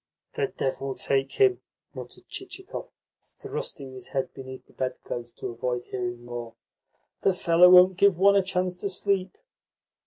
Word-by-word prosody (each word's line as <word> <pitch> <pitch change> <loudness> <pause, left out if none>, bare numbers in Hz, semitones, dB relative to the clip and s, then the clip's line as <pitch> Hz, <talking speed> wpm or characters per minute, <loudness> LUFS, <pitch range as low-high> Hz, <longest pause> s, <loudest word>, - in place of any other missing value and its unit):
"The 440 -3 0
devil 135 - -3
take 135 0 0
him!" 395 -2 +3 0.3
muttered - - -10
Chichikov, 385 +6 -7 0.3
thrusting 420 - -7
his 130 -1 -9
head 135 -1 -3
beneath 130 0 -9
the - - -24
bedclothes 120 -2 -4
to - - -6
avoid 125 +1 -2
hearing 120 -1 -4
more. 120 -1 -7 0.7
"The 190 - +2
fellow 175 0 +6
won't 180 0 +7
give 200 -2 +4
one 200 +2 +5
a 200 - +5
chance 180 -1 -1
to 200 - -3
sleep." 195 - -1
180 Hz, 150 wpm, -26 LUFS, 130-200 Hz, 0.7 s, won't